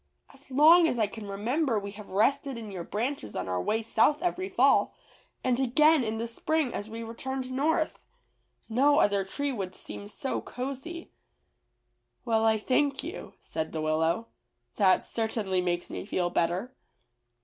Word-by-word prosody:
As 275 0 -13
long 320 +6 +7
as 250 - -1
I 220 - +3
can 210 +1 -8
remember 230 +6 0
we 200 -1 -4
have 210 0 -11
rested 265 +6 +1
in 220 -3 -7
your 180 -3 -5
branches 230 - -3
on - - -3
our 90 -1 -1
way 225 - 0
south 290 +8 +2
every 370 +2 -1
fall, - - +3 0.5
and 250 -1 +1
again 295 +3 +4
in 220 -1 -2
the 230 +1 -3
spring 290 +4 -1
as 205 +2 -5
we 225 +1 -6
returned 255 +3 -5
north. 310 +4 0 0.7
No 275 +6 +3
other 200 -8 +3
tree 285 +9 -3
would 190 -7 -4
seem 205 - -8
so 265 +5 -3
cozy." 275 +7 -6 1.1
"Well, 225 -2 +2
I 220 0 +4
thank 275 +5 +1
you," 335 +7 -7
said 160 -1 -4
the 160 - -2
Willow; 160 +7 0 0.5
"that 190 -3 +4
certainly 215 -5 -1
makes 175 -1 -1
me - - -6
feel 175 -3 0
better." 180 +9 0
230 Hz, 160 wpm, -28 LUFS, 200-275 Hz, 1.1 s, long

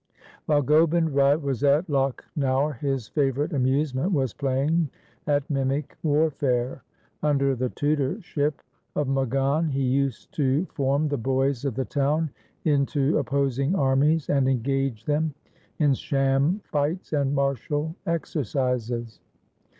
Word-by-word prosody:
While 145 -2 +3
Gobind 160 +3 +3
Rai 140 +1 +4
was 140 -5 -3
at 145 +4 +4
Lakhnaur 135 -1 0
his 135 -5 -2
favourite 145 +4 0
amusement 135 +4 +1
was 135 - 0
playing 140 +4 0 0.4
at 145 -1 +1
mimic 135 0 -1
warfare. 140 -5 +1 0.4
Under 140 -2 +2
the 125 +1 -1
tutorship 145 - -1 0.3
of 150 -2 0
Magan 135 +4 +1
he 135 -1 -1
used 135 +1 -1
to 145 +3 +2
form 140 0 +1
the 145 -3 -2
boys 135 +2 0
of 135 -5 -1
the 130 0 -1
town 150 +2 0 0.3
into 145 -1 +2
opposing 140 +3 0
armies 140 +2 +2
and 135 -2 +2
engage 135 -2 -1
them 150 0 0 0.4
in 145 -3 +3
sham 135 - +1
fights 155 +4 -2
and 140 -1 +1
martial 145 +3 -1
exercises. 125 -7 -2
140 Hz, 120 wpm, -25 LUFS, 135-150 Hz, 0.4 s, Rai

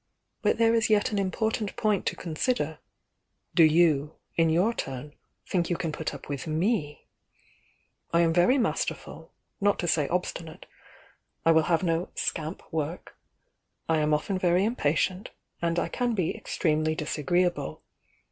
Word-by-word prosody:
But - - +2
there 230 0 +4
is 225 -1 +2
yet 210 0 +3
an 205 - 0
important 210 +2 -1
point 210 -3 0
to - - 0
consider, 160 - -2 0.4
— - - -51
do - - +4
you, 155 -2 +4 0.2
in 165 -1 +3
your 180 +8 +3
turn, 135 - -5 0.3
think 175 -3 0
you 175 - +1
can 165 -3 -2
put 155 +1 -3
up - - -10
with 140 -2 -4
rnef 155 -1 0 1.1
I 170 - +4
am 165 -1 +3
very 180 +11 +4
masterful, 245 - -2 0.3
not 205 0 +3
to 175 - -2
say 155 -3 +2
obstinate; 170 -2 -4 0.8
I 165 - +6
will 160 -1 +4
have 165 +1 +2
no 165 0 0
'scamp' 160 +1 -3
work, 160 +2 -4 0.4
— - - -51 0.3
I 160 -1 +2
am 150 0 +1
often 185 +6 0
very 180 +1 +3
impatient, 185 -2 0 0.3
and 170 0 0
I - - +1
can 245 -2 -1
be 180 -5 0
extremely 155 -1 0
disagree 165 +4 +1
able. 175 - -4
170 Hz, 160 wpm, -27 LUFS, 155-195 Hz, 1.1 s, I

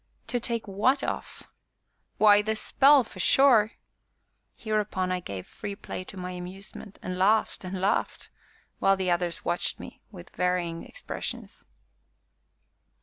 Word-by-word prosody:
"To 245 - 0
take 235 -2 -2
what 230 +8 +1
off?" - - -5 0.7
"Why, 205 -1 +6
the 220 +1 -1
spell, 275 +5 +5
for - - -13
sure." 240 -5 +5 0.8
Hereupon 210 -4 -1
I 185 - 0
gave 100 - -7
free 200 -1 -7
play 185 - -7
to 195 - -9
my 180 0 -5
amusement, 185 +3 -9
and 185 0 -4
laughed, 215 +3 +2
and 185 0 -5
laughed, 195 +2 -1 0.5
while 195 0 +4
the 185 -1 0
others 175 -1 -1
watched 175 - -1
me - - -11
with 180 -4 -12
varying 180 -2 -1
expressions. - - -7
195 Hz, 135 wpm, -27 LUFS, 180-220 Hz, 0.8 s, Why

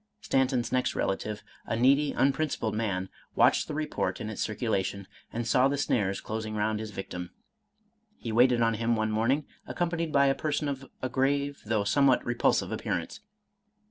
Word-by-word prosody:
Stanton's 130 - +1
next 130 0 +1
relative, 105 +2 -2 0.2
a - - -1
needy 140 +5 +4
unprincipled 135 -5 0
man, 100 -4 -1 0.3
watched - - +4
the 150 - -4
report 155 0 -2
in 110 - -4
its 110 - -2
circula 110 -2 0
tion, 100 0 -6 0.2
and 120 0 -3
saw 125 +3 +4
the 140 +1 -1
snares 100 -7 0
closing 110 0 -4
round 105 0 0
his 110 0 -5
victim. 90 -3 -6 0.9
He 115 - -5
waited 120 +1 +4
on 115 0 +3
him 115 +1 +1
one 110 0 0
morning, 120 +7 +1 0.2
accompanied 170 -2 -1
by 140 -1 +4
a 135 - +4
person 150 +1 -2
of 135 -1 -5
a - - +1
grave, 140 +2 0
though 110 -2 +1
somewhat 135 +5 +3
repulsive 120 0 +1
appearance. 85 -1 -3
120 Hz, 170 wpm, -28 LUFS, 110-140 Hz, 0.9 s, needy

